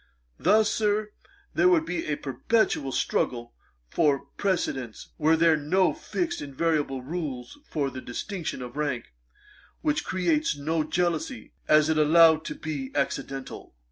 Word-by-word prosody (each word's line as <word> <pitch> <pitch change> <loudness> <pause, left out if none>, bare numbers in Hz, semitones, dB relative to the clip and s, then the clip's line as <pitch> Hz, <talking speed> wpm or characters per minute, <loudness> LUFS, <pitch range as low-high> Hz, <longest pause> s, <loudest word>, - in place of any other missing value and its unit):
Thus, 215 +1 +4
Sir, 210 0 0 0.4
there - - +4
would 330 -3 +3
be 175 - -3
a 150 - 0
perpetual 145 - 0
struggle 120 -2 -1 0.3
for 140 - +1
precedence, 140 - -2
were 160 +1 +4
there 165 0 +5
no 170 +6 +2
fixed 345 -1 -3
invariable 145 -2 -1
rules 145 - -5
for 140 -3 -1
the 130 - -7
distinction 160 - -5
of 125 +1 -9
rank, 140 - -2 0.7
which 300 -1 0
creates 190 - 0
no 155 +2 0
jealousy, 175 - -2
as 155 0 +5
it 160 -1 +2
is - - +6
allowed 160 0 +6
to 150 - -4
be 145 -5 -5
accidental.' 135 - -3
155 Hz, 140 wpm, -26 LUFS, 135-185 Hz, 0.7 s, is